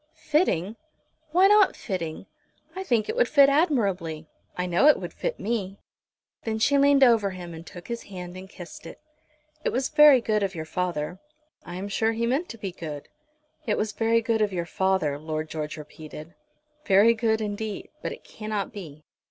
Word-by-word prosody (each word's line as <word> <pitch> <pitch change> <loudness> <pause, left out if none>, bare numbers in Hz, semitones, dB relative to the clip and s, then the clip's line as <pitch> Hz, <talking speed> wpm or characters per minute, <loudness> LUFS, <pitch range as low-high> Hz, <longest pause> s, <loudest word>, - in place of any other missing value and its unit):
"Fitting! 230 - 0 0.5
Why 365 +4 +5
not 415 -1 +5
fitting? 175 -6 -5 0.5
I 380 - -4
think 235 - +1
it - - -2
would - - +3
fit 280 -2 +6
admirably. 200 - +1 0.3
I 180 - -1
know 180 +10 +3
it 300 - +6
would - - -7
fit - - -3
me." 200 -3 -2 0.7
Then 220 -1 -2
she 280 +5 +3
leaned 280 0 +5
over 225 -5 +5
him 180 -2 -8
and 165 0 -9
took 175 - -11
his 235 -1 -4
hand 180 -2 -8
and 190 +1 -9
kissed 175 -3 -10
it. - - -11 0.6
"It - - +1
was 260 +2 -1
very 300 -3 +7
good 215 -2 0
of 195 -2 -1
your 160 -1 -5
father." 175 0 -3 0.5
"I 175 - -6
am 190 +2 -4
sure 220 +2 0
he 230 +1 -1
meant 275 +9 0
to 230 - -8
be 200 -3 -5
good." 155 -5 -7 0.6
"It 215 - +1
was 215 0 -1
very 230 +1 +1
good 225 -1 +1
of 210 -1 +2
your 175 -2 -2
father," 185 -5 0
Lord 155 0 -4
George 155 -1 -4
repeated, 155 +2 -10 0.5
"very 205 +2 +5
good 220 -1 +1
indeed; 210 0 -4
but - - -3
it - - -9
cannot 215 -1 -4
be. 155 -7 -9
205 Hz, 185 wpm, -26 LUFS, 175-235 Hz, 0.7 s, very